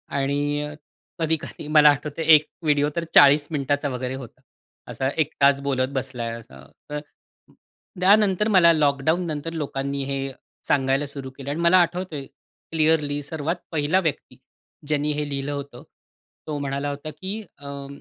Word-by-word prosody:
आणि 145 Hz, +1 st, 0 dB
अ, 150 Hz, 0 st, -6 dB, 0.5 s
कधी-कधी 160 Hz, -1 st, -2 dB
मला 150 Hz, -1 st, +9 dB
आठवतंय 150 Hz, +2 st, -1 dB
1 150 Hz, 0 st, +2 dB
व्हिडिओ 145 Hz, -2 st, +2 dB
तर 170 Hz, -, -1 dB
40 145 Hz, +1 st, +7 dB
मिनिटाचा 145 Hz, 0 st, -1 dB
वगैरे 125 Hz, 0 st, -4 dB
होता. 130 Hz, -4 st, -11 dB, 0.5 s
असा 130 Hz, 0 st, -2 dB
एकटाच 140 Hz, -2 st, +2 dB
बोलत 130 Hz, -2 st, 0 dB
बसलाय 125 Hz, -3 st, -3 dB
असा, 65 Hz, -, -15 dB, 0.3 s
तर 150 Hz, 0 st, -3 dB, 1.0 s
त्यानंतर 200 Hz, +1 st, +4 dB
मला 170 Hz, -2 st, +7 dB
लॉकडाउन 155 Hz, +3 st, +1 dB
नंतर 155 Hz, +2 st, -4 dB
लोकांनी 140 Hz, -2 st, -3 dB
हे 140 Hz, 0 st, -2 dB, 0.5 s
सांगायला 135 Hz, 0 st, +2 dB
सुरु 140 Hz, -1 st, -6 dB
केलं. 140 Hz, 0 st, -8 dB
आणि 150 Hz, +4 st, -3 dB
मला 170 Hz, +2 st, +5 dB
आठवतंय 170 Hz, -4 st, -2 dB, 0.5 s
क्लिअरली 155 Hz, -2 st, +1 dB
सर्वात 160 Hz, +3 st, -3 dB, 0.2 s
पहिला 160 Hz, +4 st, +2 dB
व्यक्ती, 160 Hz, -6 st, -3 dB, 0.5 s
ज्यांनी 150 Hz, 0 st, 0 dB
हे 150 Hz, 0 st, -2 dB
लिहिलं 140 Hz, 0 st, -3 dB
होतं. 140 Hz, -3 st, -7 dB, 0.6 s
तो 150 Hz, -1 st, -3 dB
म्हणाला 140 Hz, +1 st, -2 dB
होता 145 Hz, +2 st, -6 dB
की 200 Hz, +4 st, -4 dB, 0.2 s
अ, 140 Hz, -1 st, -7 dB
145 Hz, 145 wpm, -23 LUFS, 140-160 Hz, 1.0 s, मला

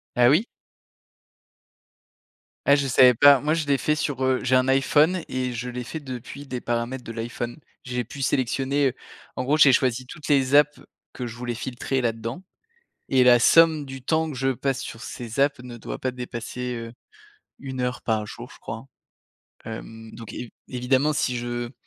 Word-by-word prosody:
Ah 120 Hz, 0 st, +5 dB
oui? 160 Hz, -, +4 dB, 2.2 s
Ah, 140 Hz, -, +6 dB
je 140 Hz, -1 st, 0 dB
savais 125 Hz, -1 st, +6 dB
pas. 140 Hz, +2 st, +7 dB
Moi, 150 Hz, +2 st, +1 dB
je 160 Hz, -3 st, -2 dB
l'ai 140 Hz, -1 st, +3 dB
fait 150 Hz, +3 st, 0 dB
sur, 140 Hz, -3 st, -2 dB
heu, 130 Hz, -1 st, +2 dB
j'ai 130 Hz, -, +2 dB
un 130 Hz, +1 st, +3 dB
iPhone 150 Hz, +6 st, +3 dB
et 130 Hz, -1 st, -2 dB
je 125 Hz, +1 st, -4 dB
l'ai 125 Hz, 0 st, -5 dB
fait 140 Hz, +6 st, -6 dB
depuis 135 Hz, 0 st, -8 dB
des 125 Hz, -2 st, -4 dB
paramètres 120 Hz, +2 st, -2 dB
de -, -, -9 dB
l'iPhone. 120 Hz, +3 st, -5 dB, 0.2 s
J'ai 125 Hz, -1 st, -3 dB
pu 135 Hz, +5 st, -8 dB
sélectionner, 135 Hz, +1 st, +1 dB
heu, -, -, -10 dB, 0.4 s
en 130 Hz, -, -3 dB
gros, 145 Hz, +4 st, +2 dB
j'ai 145 Hz, -3 st, +7 dB
choisi 125 Hz, 0 st, +1 dB
toutes 150 Hz, +3 st, -9 dB
les 135 Hz, -2 st, +3 dB
apps 150 Hz, 0 st, +5 dB, 0.3 s
que 125 Hz, -, -5 dB
je 115 Hz, -, -7 dB
voulais 120 Hz, 0 st, -4 dB
filtrer 130 Hz, +2 st, -2 dB
là-dedans 115 Hz, -, -3 dB, 0.7 s
et 130 Hz, -1 st, +5 dB
la 120 Hz, -1 st, +7 dB
somme 160 Hz, +1 st, +5 dB
du 135 Hz, -1 st, -9 dB
temps 160 Hz, +3 st, 0 dB
que 135 Hz, -, -7 dB
je 135 Hz, +1 st, +1 dB
passe 135 Hz, +1 st, -1 dB
sur 115 Hz, -1 st, -8 dB
ces 120 Hz, +3 st, -7 dB
apps 140 Hz, 0 st, +3 dB
ne 125 Hz, -1 st, -9 dB
doit 115 Hz, -, -7 dB
pas 130 Hz, -1 st, -2 dB
dépasser, 125 Hz, 0 st, -5 dB
heu, 115 Hz, 0 st, -7 dB, 0.7 s
1 130 Hz, -2 st, -5 dB
heure 125 Hz, 0 st, -2 dB
par 110 Hz, -2 st, -1 dB
jour, 120 Hz, +3 st, -9 dB
je -, -, -15 dB
crois, 115 Hz, +4 st, -7 dB, 0.8 s
hem, 110 Hz, 0 st, -8 dB
donc 115 Hz, -2 st, -9 dB
évi 120 Hz, -, -7 dB, 0.2 s
évidemment 130 Hz, +4 st, +1 dB
si 125 Hz, -4 st, 0 dB
je 120 Hz, 0 st, -4 dB
130 Hz, 185 wpm, -24 LUFS, 120-140 Hz, 2.2 s, pas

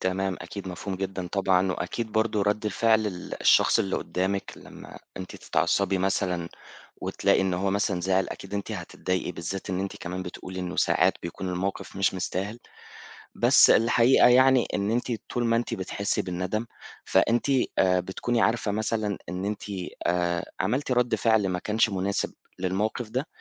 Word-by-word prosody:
تمام، 95 Hz, 0 st, -1 dB
أكيد 100 Hz, -2 st, -7 dB
مفهوم 90 Hz, +2 st, -5 dB
جدًا 95 Hz, -1 st, -4 dB
طبعًا، 95 Hz, -2 st, +2 dB
وأكيد 110 Hz, +6 st, -4 dB
برضو 110 Hz, -2 st, +1 dB
رد 105 Hz, +1 st, 0 dB
فعل 110 Hz, +1 st, +2 dB
ال 90 Hz, -3 st, -6 dB
الشخص -, -, +5 dB
اللي 95 Hz, -, 0 dB
قدّامِك 95 Hz, +2 st, -2 dB
لمّا -, -, -12 dB, 0.2 s
أنتِ 95 Hz, -1 st, -7 dB
تتعصبي 95 Hz, -1 st, +1 dB
مثلًا 90 Hz, -3 st, 0 dB, 0.5 s
وتلاقي -, -, +2 dB
إن 95 Hz, -1 st, +1 dB
هو 95 Hz, +2 st, 0 dB
مثلًا 100 Hz, -2 st, 0 dB
زعل، 95 Hz, +1 st, +1 dB
أكيد 100 Hz, +1 st, -8 dB
أنتِ 100 Hz, +2 st, -3 dB
هتضايقي 90 Hz, -1 st, -3 dB
بالذات 90 Hz, +3 st, -5 dB
إن 90 Hz, 0 st, -1 dB
أنتِ 95 Hz, -, -4 dB
كمان 90 Hz, +1 st, -5 dB
بتقولي 90 Hz, +1 st, -7 dB
إنّه 90 Hz, 0 st, -4 dB
ساعات -, -, +3 dB
بيكون 90 Hz, +2 st, -5 dB
المَوقِف 95 Hz, +2 st, -3 dB
مش 95 Hz, -1 st, +1 dB
مستاهل. 95 Hz, +5 st, -3 dB, 0.8 s
بس -, -, +6 dB
الحقيقة 120 Hz, +2 st, +5 dB
يعني 130 Hz, 0 st, +5 dB
إن 100 Hz, +1 st, 0 dB
أنتِ 120 Hz, +1 st, -1 dB, 0.2 s
طول 120 Hz, -1 st, -1 dB
ما 115 Hz, 0 st, +3 dB
أنتِ 120 Hz, -, -1 dB
بتحسّي 100 Hz, +2 st, -2 dB
بالندم 90 Hz, +5 st, -3 dB, 0.4 s
فأنتِ 115 Hz, +5 st, +2 dB, 0.3 s
آآ، 90 Hz, -1 st, +4 dB
بتكوني 115 Hz, +6 st, -1 dB
عارفة 110 Hz, -2 st, +1 dB
مثلًا 110 Hz, -1 st, -1 dB
إن 90 Hz, +2 st, -3 dB
أنتِ 105 Hz, +1 st, -3 dB, 0.4 s
آآ، 85 Hz, -1 st, 0 dB
عملتِ 125 Hz, +8 st, 0 dB
رد 125 Hz, -1 st, +2 dB
فِعل 110 Hz, -4 st, +2 dB
ما 90 Hz, 0 st, -1 dB
كانش 110 Hz, +3 st, +1 dB
مناسب 100 Hz, +1 st, -1 dB, 0.3 s
للمَوقِف 105 Hz, +5 st, -1 dB
ده. 130 Hz, +7 st, -2 dB
95 Hz, 160 wpm, -26 LUFS, 90-110 Hz, 0.8 s, بس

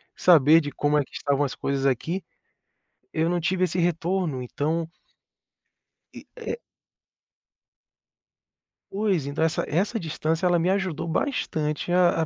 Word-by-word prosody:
saber 160 Hz, -2 st, +6 dB
de 145 Hz, -1 st, -5 dB
como 145 Hz, 0 st, +1 dB
é 145 Hz, -, +2 dB
que -, -, -23 dB
estavam 140 Hz, 0 st, 0 dB
as 135 Hz, -, -2 dB
coisas 140 Hz, 0 st, -2 dB
aqui, 160 Hz, +8 st, 0 dB, 0.9 s
eu 160 Hz, +1 st, +1 dB
não 175 Hz, 0 st, 0 dB
tive 185 Hz, +2 st, +1 dB
esse 180 Hz, 0 st, -2 dB
retorno. 170 Hz, -4 st, 0 dB
Então 160 Hz, +6 st, -2 dB, 1.3 s
E -, -, -12 dB
é 470 Hz, -1 st, -4 dB, 2.3 s
Pois. 195 Hz, -7 st, 0 dB
Então 145 Hz, +3 st, -1 dB
essa 160 Hz, -, +1 dB
essa 200 Hz, +9 st, 0 dB
distância 160 Hz, +1 st, -2 dB
ela 175 Hz, -1 st, +3 dB
me 175 Hz, +3 st, +1 dB
ajudou 190 Hz, -5 st, -1 dB
bastante 160 Hz, -, -1 dB
a 175 Hz, -2 st, +4 dB
a -, -, +1 dB
165 Hz, 135 wpm, -25 LUFS, 150-180 Hz, 2.3 s, saber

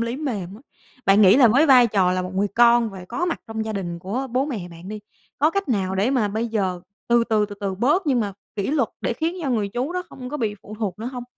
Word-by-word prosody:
lý 235 Hz, +2 st, -2 dB
mềm 210 Hz, -, -4 dB
á. 215 Hz, -, -13 dB, 0.5 s
Bạn 195 Hz, +2 st, +6 dB
nghĩ 195 Hz, +2 st, +7 dB
là 260 Hz, -4 st, +7 dB
với 275 Hz, +8 st, +4 dB
vai 255 Hz, -4 st, +7 dB
trò 195 Hz, -5 st, +2 dB
là 185 Hz, 0 st, -1 dB
một 185 Hz, +1 st, -6 dB
người 200 Hz, +2 st, +1 dB
con 235 Hz, -1 st, +5 dB
và 190 Hz, -2 st, -9 dB
có 350 Hz, -, -2 dB
mặt 345 Hz, -, -2 dB
trong 220 Hz, 0 st, -4 dB
gia 220 Hz, -, -4 dB
đình 175 Hz, -4 st, -4 dB
của 210 Hz, +10 st, -3 dB
bố 255 Hz, +3 st, +1 dB
mẹ 210 Hz, -11 st, -5 dB
bạn 170 Hz, +2 st, -12 dB
đi, 210 Hz, 0 st, -6 dB, 0.4 s
có 300 Hz, +2 st, +3 dB
cách 395 Hz, -1 st, -2 dB
nào 190 Hz, -6 st, 0 dB
để 200 Hz, +7 st, +1 dB
mà 235 Hz, -6 st, +1 dB
bây 220 Hz, +3 st, -2 dB
giờ 190 Hz, -5 st, -1 dB, 0.3 s
từ 235 Hz, 0 st, +4 dB
từ, 215 Hz, -2 st, +1 dB
từ 205 Hz, -, -9 dB
từ 195 Hz, -1 st, -2 dB
bớt 295 Hz, -, +1 dB
nhưng 260 Hz, -4 st, +2 dB
mà 205 Hz, -3 st, -2 dB, 0.2 s
kỷ 200 Hz, -1 st, -1 dB
luật 280 Hz, -6 st, +1 dB
để -, -, -1 dB
khiến 325 Hz, +9 st, -2 dB
cho 275 Hz, -, -1 dB
người 215 Hz, -5 st, 0 dB
chú 250 Hz, -, -3 dB
đó 365 Hz, -, -2 dB
không 250 Hz, -1 st, -9 dB
có 295 Hz, -, -3 dB
bị 220 Hz, -7 st, -2 dB
phụ 215 Hz, -, -10 dB
thuộc 200 Hz, -4 st, -3 dB
nữa 225 Hz, -, -5 dB
hông? 245 Hz, -1 st, -6 dB
225 Hz, 280 wpm, -22 LUFS, 195-255 Hz, 0.5 s, nghĩ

